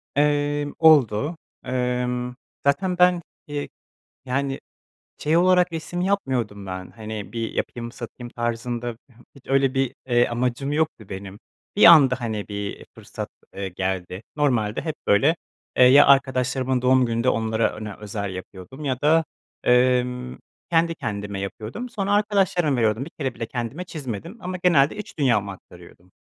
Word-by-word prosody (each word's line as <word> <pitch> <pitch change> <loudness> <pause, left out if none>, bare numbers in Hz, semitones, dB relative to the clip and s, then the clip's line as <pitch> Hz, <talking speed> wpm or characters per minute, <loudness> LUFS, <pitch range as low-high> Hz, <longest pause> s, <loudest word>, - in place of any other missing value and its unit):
Emm, 145 0 +1
oldu. 150 -1 +4 0.3
Imm, 125 -1 -1 0.3
zaten 180 +6 +1
ben, 180 -1 +4 0.3
iii, 145 -1 -4 0.6
yani, 135 +1 -2 0.6
şey 155 +3 +1
olarak 180 0 +4
resim 165 +2 -4
yapmıyordum 130 - -1
ben, 95 -1 -6
hani, 110 -2 -7
bir 115 -1 -3
yapayım 120 -1 -4
satayım 120 0 -8
tarzında, 120 +1 -2
h 120 +3 -22 0.2
hiç 140 - -18
öyle 135 -1 +2
bir, 135 -2 0
eee, 120 -1 +3
amacım 125 +4 -1
yoktu 150 -9 -1
benim. 95 +1 -8 0.4
Bir 210 - +6
anda, 135 -6 +7
hani, 110 -3 -3
bir, 105 - -7
iii, 100 0 -5
fırsat, - - -7 0.3
eee, 95 -1 -3
geldi. 95 +1 -3
Normalde 120 -8 +1
hep 160 -2 -3
böyle, 140 +12 +4 0.4
eee, 125 - +7
ya 140 +3 +8
arkadaşlarımın 130 -1 +2
doğum 130 -1 +4
gününde 115 +2 0
onlara 110 -1 +1
ona 105 -2 -7
özel 100 -2 -4
yapıyordum 95 +10 -9
ya 130 -2 -1
da, 160 +2 +4 0.4
emm, 125 0 +2 0.3
kendi 165 0 +3
kendime 100 -8 -4
yapıyordum. 110 - -6
Sonra 205 -3 -2
arkadaşlarıma 195 -8 +2
veriyordum, 110 +1 +1
bir 165 - -11
kere 135 -5 -2
bile 115 -1 -5
kendime 125 +10 -4
çizmedim 155 - -6
ama 185 -1 -4
genelde 155 -2 +4
iç 210 - -9
dünyamı 115 -8 +2
aktarıyordum. 90 -1 -14
125 Hz, 145 wpm, -23 LUFS, 110-150 Hz, 0.6 s, ya